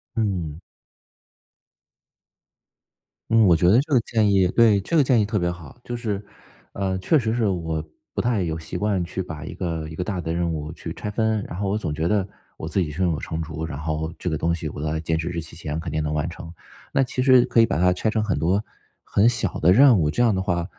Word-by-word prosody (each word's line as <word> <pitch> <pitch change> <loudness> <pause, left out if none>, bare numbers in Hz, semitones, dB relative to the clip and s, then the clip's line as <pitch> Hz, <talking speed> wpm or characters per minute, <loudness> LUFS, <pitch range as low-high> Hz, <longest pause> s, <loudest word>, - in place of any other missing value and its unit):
嗯。 90 -9 -2 2.7
嗯， 115 -1 +6
我 90 - +6
觉 85 - +3
得 100 +6 +6
这 150 +2 -10
个 130 - +6
建 110 -3 +1
议 95 -2 +4
对， 110 +1 +4
这 100 - -3
个 155 - +6
建 125 -3 +3
议 105 - +2
特 105 +1 -1
别 85 -2 0
好。 85 +2 -11
就 120 - -5
是， 105 -4 -3 0.5
呃， 95 -1 -2
确 150 - +3
实 110 -3 -1
是 120 -2 +1
我 80 -5 -2 0.3
不 - - 0
太 120 -4 +1
有 80 -2 -2
习 80 +2 -6
惯 100 -2 0
去 85 +2 -4
把 80 -5 -7
一 - - -7
个 80 -3 -3
一 80 - -8
个 90 - -2
大 90 -1 -3
的 80 0 -3
任 85 0 0
务 75 0 -4
去 85 0 -7
拆 105 - -5
分， 110 -1 0
然 85 - -7
后 100 - -1
我 100 - 0
总 85 -8 -3
觉 80 +2 -1
得 100 0 +1 0.3
我 80 - -6
自 95 - 0
己 85 -5 0
胸 85 +4 0
有 75 - -2
成 80 0 -4
竹， 80 0 -5
然 80 -4 -6
后 80 +2 -3
这 90 - -3
个 80 - -1
东 85 +3 0
西 80 -2 -5
我 75 - -7
在 80 +1 -1
截 80 0 -1
止 80 +1 -3
日 85 -1 -3
期 80 0 -12
前 75 -2 -4
肯 80 0 -5
定 80 - -1
能 75 0 -2
完 75 +2 -1
成。 85 0 -9 0.4
那 135 - +3
其 125 0 -2
实 130 -1 +6
可 115 - +1
以 115 - +7
把 115 - -1
它 90 +2 +4
拆 90 +4 0
成 110 0 0
很 105 -3 -1
多 95 +6 +1 0.4
很 100 +3 +3
小 120 - 0
的 90 +4 +5
任 125 -1 +7
务， 75 -2 +2
这 100 +11 +1
样 115 -3 +4
的 95 - 0
话 85 -2 -1
90 Hz, 270 characters per minute, -23 LUFS, 80-105 Hz, 2.7 s, 以